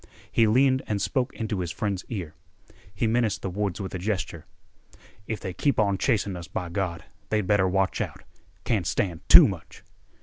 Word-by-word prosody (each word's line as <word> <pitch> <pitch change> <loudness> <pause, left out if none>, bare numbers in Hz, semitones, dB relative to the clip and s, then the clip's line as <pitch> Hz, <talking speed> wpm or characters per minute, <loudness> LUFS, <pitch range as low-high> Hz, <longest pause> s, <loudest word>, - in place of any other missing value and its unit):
He 115 - +4
leaned 130 +4 +3
and 105 -2 -1
spoke 125 +5 0
into 110 -3 -3
his 90 -2 -2
friend's 100 0 -2
ear. 90 -9 -5 0.6
He 100 +4 -2
menaced 115 -1 +1
the 95 - -2
woods 100 -1 -2
with 95 -2 -5
a 90 - -3
gesture. 90 -5 -3 0.8
"If 110 - -3
they 95 -3 -5
keep 140 +8 +1
on 100 -3 +2
chasing 105 -6 +1
us, 85 -1 -7
by 90 -1 -4
Gawd, 85 -1 -3 0.3
they'd 105 -2 +1
better 95 -1 +3
watch 95 0 0
out. - - -5 0.4
Can't 100 -7 0
stand 90 -3 -1
too - - +10
much." - - -8
100 Hz, 180 wpm, -26 LUFS, 90-110 Hz, 0.8 s, too